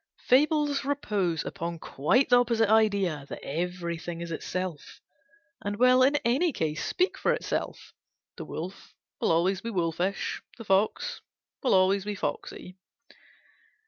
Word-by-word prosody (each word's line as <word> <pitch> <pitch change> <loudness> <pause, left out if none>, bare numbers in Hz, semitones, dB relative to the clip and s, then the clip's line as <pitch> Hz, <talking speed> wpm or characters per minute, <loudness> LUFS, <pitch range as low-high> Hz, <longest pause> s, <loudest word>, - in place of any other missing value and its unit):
Fables 290 +1 +3
repose 210 - -1
upon 170 0 -4
quite 165 - +1
the 245 - +7
opposite 230 -3 +2
idea; 200 -10 +2
that - - -5
everything 170 +1 -4
is 170 -1 -5
itself, 175 -1 -5 0.6
and 205 0 -2
will 255 +2 +5
in 275 +3 +5
any 280 +9 +2
case 155 - -2
speak 365 +1 0
for - - +2
itself. - - -4 0.4
The - - -7
wolf 180 +5 -7 0.2
will - - 0
be - - +3
always 185 +4 +1
wolfish; 185 -3 -1 0.2
the 230 - -9
fox 195 +2 +1 0.4
will 260 - 0
be - - +5 0.3
always 205 -1 -5
foxy. 180 +5 -5
195 Hz, 135 wpm, -28 LUFS, 170-245 Hz, 0.6 s, the